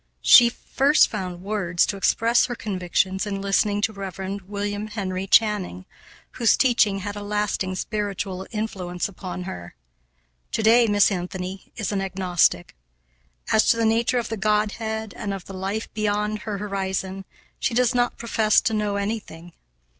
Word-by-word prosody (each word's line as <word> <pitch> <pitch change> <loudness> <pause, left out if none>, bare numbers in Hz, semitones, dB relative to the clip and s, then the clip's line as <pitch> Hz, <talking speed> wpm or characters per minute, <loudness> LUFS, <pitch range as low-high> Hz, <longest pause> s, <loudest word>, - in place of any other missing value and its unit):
She 240 -1 +8
first 275 +4 +3
found 185 -4 -5
words 190 -4 +1
to - - -3
express 230 +4 +2
her 245 - -4
convictions 190 -1 -1
in 195 -1 -3
listening 205 +1 +1
to 220 +1 +1
Rev. 195 0 -5
William 205 +1 -3
Henry 195 -3 -4
Channing, 200 - +2 0.5
whose 230 -4 +3
teaching 220 -6 +3
had 205 +1 -5
a 205 - -6
lasting 205 -2 -2
spiritual 195 -2 -3
influence 195 -6 -3
upon 185 -2 -7
her. 90 - -8 0.8
To 220 - 0
day 230 +2 +6
Miss 205 0 +4
Anthony 185 +1 -5
is 220 -3 -3
an 200 -1 -1
agnostic. 180 - +1 0.8
As 220 - +4
to 230 - +4
the 230 - +1
nature 230 +3 +2
of 235 - -2
the 225 - -3
Godhead 215 +1 -1
and 200 -3 -4
of 190 - -9
the 195 - -9
life 195 +4 -3
beyond 210 0 -1
her 210 -1 -4
horizon 195 -1 -3 0.4
she 235 - -1
does 250 0 +3
not 245 -1 +1
profess 220 -2 +2
to 225 - -1
know 210 -1 -1
anything. 200 -5 -5
205 Hz, 155 wpm, -23 LUFS, 190-220 Hz, 0.8 s, She